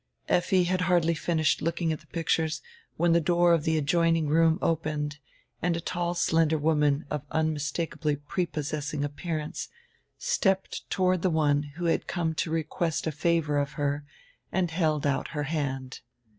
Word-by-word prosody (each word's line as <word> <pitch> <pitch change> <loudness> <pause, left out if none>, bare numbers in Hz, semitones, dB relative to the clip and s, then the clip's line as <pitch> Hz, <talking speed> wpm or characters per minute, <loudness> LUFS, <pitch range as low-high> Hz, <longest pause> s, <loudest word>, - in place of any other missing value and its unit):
Effi 180 +1 +3
had 180 +1 0
hardly 175 -2 +3
finished 160 -1 +1
looking 165 0 0
at 155 - -5
tire - - -22
pictures 160 -1 0 0.3
when 170 0 +3
tire 170 - +5
door 175 +1 +4
of 165 -3 +2
tire 160 0 +2
adjoining 165 +1 +2
roonr 160 +1 +4
opened 150 -2 -1 0.4
and 170 0 +1
a - - -2
tall 175 0 -2
slender 160 -2 +2
woman 150 -1 +2
of 150 - -1
unmistakably 155 0 -1
prepossessing 150 -1 -3
appearance 150 +1 -4 0.5
stepped 205 - 0
toward 185 -2 +2
die 185 - +2
one 150 -3 +2 0.2
who 175 - -3
had 165 - +1
come 165 -3 -1
to 160 - -2
request 160 0 -1
a 160 - 0
favor 150 -1 +1
of 140 -1 -2
her 145 0 -1 0.5
and 180 -3 0
held 155 -3 +1
out 140 -1 0
her 150 - 0
hand. 135 -4 -3
160 Hz, 155 wpm, -28 LUFS, 150-170 Hz, 0.5 s, tire